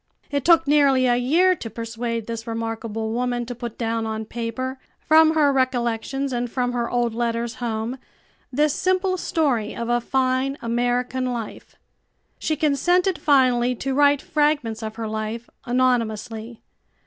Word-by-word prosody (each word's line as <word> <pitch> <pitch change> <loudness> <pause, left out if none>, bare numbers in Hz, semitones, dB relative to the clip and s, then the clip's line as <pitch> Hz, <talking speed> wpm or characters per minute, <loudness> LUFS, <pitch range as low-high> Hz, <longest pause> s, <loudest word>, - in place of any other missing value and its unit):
It 285 -2 0
took 330 0 +5
nearly 280 -3 +4
a 245 -1 +3
year 325 +10 +3
to 230 - -7
persuade 230 0 -4
this 230 0 -6
remarkable 225 -1 -3
woman 245 0 -1
to 245 - -5
put 235 -1 -7
down 225 -1 -1
on 220 0 -3
paper, 240 +4 -4 0.2
from 315 +1 +5
her 290 -3 +4
recollections 260 +1 -1
and 240 0 -2
from 245 0 -1
her 240 -1 -2
old 240 -2 0
letters 235 0 -1
home, 230 +2 -3 0.5
this 295 +3 +2
simple 370 +2 +1
story 285 - 0
of 235 0 -4
a 240 0 +2
fine 260 +2 0
American 245 +2 -1
life. 230 -3 -7 0.6
She 310 - 0
consented 340 +5 +2
finally 250 -4 +3
to 270 +3 -3
write 285 0 +4
fragments 295 -7 0
of 220 0 -5
her 225 -1 -4
life, 220 +2 -4 0.2
anonymously. 235 -2 -1
245 Hz, 150 wpm, -23 LUFS, 230-275 Hz, 0.6 s, took